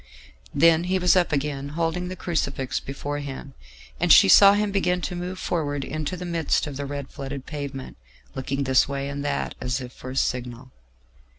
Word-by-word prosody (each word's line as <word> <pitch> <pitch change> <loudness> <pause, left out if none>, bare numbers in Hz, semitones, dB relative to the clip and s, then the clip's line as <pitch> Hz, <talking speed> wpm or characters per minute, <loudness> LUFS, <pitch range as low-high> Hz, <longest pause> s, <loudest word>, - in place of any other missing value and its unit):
Then 165 +3 +5
he 185 +1 +1
was 180 0 +4
up 180 -2 +2
again, 140 -1 -2
holding 170 +2 -1
the 185 - -5
crucifix 140 -8 -2
before 145 +1 -5
him, 140 -1 -7 0.5
and - - +2
she - - +9
saw 200 - +8
him 205 0 0
begin 180 -2 +1
to 180 - -4
move 180 +1 -5
forward 145 -6 -2
into 155 +3 -4
the 180 - -6
midst 170 -3 0
of 145 -2 -6
the 140 0 -4
red 140 -1 -5
flooded 135 -1 -6
pavement, 140 -3 -6 0.4
looking 135 +1 -2
this 130 -1 +3
way 140 0 -3
and 140 0 -4
that 145 -1 -2
as 125 +1 -1
if 125 -1 -8
for 130 - -9
a 130 - -6
signal. 125 0 -2
145 Hz, 190 wpm, -24 LUFS, 135-175 Hz, 0.5 s, she